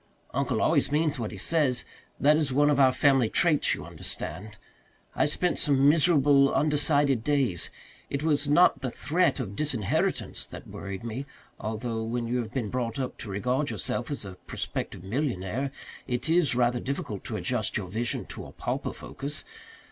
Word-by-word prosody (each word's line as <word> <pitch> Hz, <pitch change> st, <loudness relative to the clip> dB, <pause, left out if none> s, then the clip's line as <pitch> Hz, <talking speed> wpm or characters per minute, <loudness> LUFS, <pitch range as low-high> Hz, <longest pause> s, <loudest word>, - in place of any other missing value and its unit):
Uncle -, -, 0 dB
always -, -, +2 dB
means 150 Hz, -2 st, +1 dB
what 110 Hz, -, -2 dB
he 105 Hz, -, -8 dB
says 130 Hz, +1 st, +2 dB, 0.3 s
that 150 Hz, +2 st, +5 dB
is 150 Hz, -3 st, +1 dB
one 145 Hz, +3 st, +4 dB
of 140 Hz, -, +2 dB
our 130 Hz, -2 st, +6 dB
family 135 Hz, -4 st, +3 dB
traits, 155 Hz, +1 st, +3 dB
you -, -, -8 dB
understand. 105 Hz, +2 st, -5 dB, 0.6 s
I -, -, +3 dB
spent 175 Hz, +4 st, +1 dB
some 140 Hz, -2 st, +4 dB
miserable, 145 Hz, -3 st, +5 dB
undecided 145 Hz, -4 st, +2 dB
days. 135 Hz, -, +1 dB, 0.4 s
It 140 Hz, +1 st, -2 dB
was 145 Hz, -2 st, +2 dB
not 175 Hz, +5 st, +5 dB
the 130 Hz, -, -1 dB
threat 155 Hz, +7 st, +1 dB
of 100 Hz, -6 st, -4 dB
disinheritance 130 Hz, -9 st, -1 dB
that -, -, -9 dB
worried 100 Hz, 0 st, -7 dB
me, 120 Hz, +4 st, -5 dB, 0.3 s
although 110 Hz, +1 st, -3 dB
when 115 Hz, +1 st, -2 dB
you 125 Hz, +2 st, 0 dB
have 110 Hz, -3 st, -4 dB
been 120 Hz, -5 st, -3 dB
brought 125 Hz, 0 st, -2 dB
up 130 Hz, -2 st, -4 dB
to 105 Hz, -, -6 dB
regard 125 Hz, +9 st, -1 dB
yourself -, -, -2 dB
as 145 Hz, -7 st, -4 dB
a 95 Hz, -2 st, -9 dB
prospective -, -, -4 dB
millionaire 120 Hz, +1 st, -2 dB, 0.4 s
it 125 Hz, +2 st, -2 dB
is 165 Hz, -6 st, +3 dB
rather 120 Hz, 0 st, +2 dB
difficult 120 Hz, -6 st, -4 dB
to 110 Hz, -, -3 dB
adjust 125 Hz, -4 st, 0 dB
your 100 Hz, -3 st, -4 dB
vision 110 Hz, +6 st, -2 dB
to -, -, -8 dB
a -, -, -12 dB
pauper -, -, -3 dB
focus. 145 Hz, +2 st, -7 dB
130 Hz, 170 wpm, -27 LUFS, 115-145 Hz, 0.6 s, our